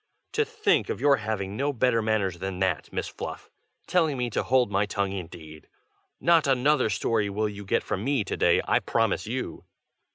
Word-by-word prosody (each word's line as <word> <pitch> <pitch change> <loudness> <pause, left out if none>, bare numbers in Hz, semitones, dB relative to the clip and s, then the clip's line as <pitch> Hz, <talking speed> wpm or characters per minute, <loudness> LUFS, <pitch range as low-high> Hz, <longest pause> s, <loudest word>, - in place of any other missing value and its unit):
"To 445 - +2
think 440 -1 +1
of - - -3
your 140 -1 +4
having 100 -4 -3
no 140 +5 0
better 125 -3 +2
manners 105 -5 0
than 95 0 -4
that, 95 -6 -1
Miss - - -3
Fluff! - - -7 0.3
telling 160 -6 +1
me 125 -1 -2
to - - 0
hold 125 -4 +2
my 100 +1 +1
tongue, 100 -1 -1
indeed! 80 -4 -8 0.5
not 165 -3 +4
another 135 -1 +3
story 105 +2 0
will 105 +2 -1
you 100 -1 -7
get 95 - 0
from 95 - -3
me 135 -3 +1
to 100 - -4
day, 85 - +3
I - - +3
promise - - 0
you!" - - -4
110 Hz, 190 wpm, -26 LUFS, 95-135 Hz, 0.5 s, your